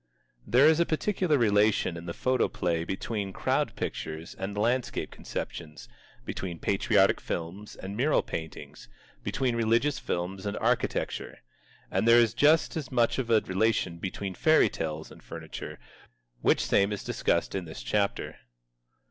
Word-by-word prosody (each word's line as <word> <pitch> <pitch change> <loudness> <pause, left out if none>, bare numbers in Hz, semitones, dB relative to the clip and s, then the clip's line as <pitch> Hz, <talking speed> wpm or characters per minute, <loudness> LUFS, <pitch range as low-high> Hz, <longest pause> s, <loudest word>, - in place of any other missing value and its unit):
There 130 +4 +5
is 160 +1 +5
a 170 - +4
particular 175 -1 +1
relation 105 -5 +3
in 85 +1 -8
the - - -2
photoplay 90 -9 0
between 100 +1 -3
Crowd - - 0
Pictures 80 +1 -5
and 100 +2 -5
landscape 120 +3 0
conceptions, 75 -7 -6 0.4
between 90 -3 -4
Patriotic - - +2
Films 90 +5 -5
and 95 +1 -7
mural 140 +7 +2
paintings, 80 -5 -7 0.3
between 130 -3 0
Religious 115 +5 +2
Films 95 +3 -3
and 100 - -3
architecture. - - -1 0.5
And - - +1
there 115 0 +8
is 115 -3 +4
just 155 +3 +4
as 150 -5 -4
much 120 0 +2
of 120 -3 -2
a 110 -2 +5
relation 95 -3 0
between 95 +1 -4
Fairy 155 - +4
Tales 80 0 -5
and - - -14
furniture, - - -8 0.6
which - - +3
same 100 +1 +3
is 105 - -4
discussed - - 0
in 95 -2 -3
this 80 -7 -8
chapter. 100 +12 -1
105 Hz, 145 wpm, -28 LUFS, 90-125 Hz, 0.6 s, there